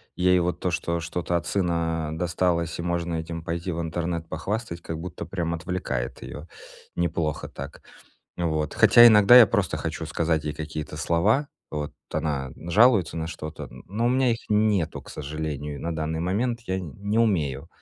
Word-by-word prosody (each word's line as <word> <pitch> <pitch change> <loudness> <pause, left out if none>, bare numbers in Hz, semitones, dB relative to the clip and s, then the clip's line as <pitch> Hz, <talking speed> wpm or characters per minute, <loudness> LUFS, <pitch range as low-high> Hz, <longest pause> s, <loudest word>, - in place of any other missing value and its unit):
Ей 90 0 +4
вот 90 0 -1
то, 90 - 0
что 85 0 -1
что-то 85 +1 -2
от - - -5
сына, 85 -4 0
а, - - -5
досталось, 85 0 0
и - - -4
можно 85 -1 -1
этим 80 0 -5
пойти 85 +2 -3
в 85 +1 -2
интернет 85 0 -3
похвастать, 85 +2 -4
как 80 -1 -5
будто, 90 0 -6
прям 85 -3 -2
отвлекает 85 -8 -3
её, 75 +2 -8 0.5
неплохо 80 -3 -1
так. 70 +2 -9 0.6
Вот. 80 -3 -1
Хотя 120 0 +8
иногда 110 +2 +8
я 115 - +9
просто 100 -6 0
хочу - - -4
сказать 80 -2 0
ей 75 - -3
какие-то 75 -1 -6
слова. 105 - +2 0.2
Вот. 75 -1 -4 0.2
Она 70 -4 -2
жалуется 100 0 +3
на 80 0 -2
что-то, 80 -2 -7
н 60 +1 -12
но 110 +5 -1
у - - +4
меня 130 -1 +3
их 115 - -2
нету, 105 -6 +1
к - - -13
сожалению. 75 -1 -5
На 85 -1 -3
данный 80 0 -2
момент 115 +7 0
я 95 0 -1
не 100 - -3
умею 80 - +1
85 Hz, 175 wpm, -25 LUFS, 80-95 Hz, 0.6 s, я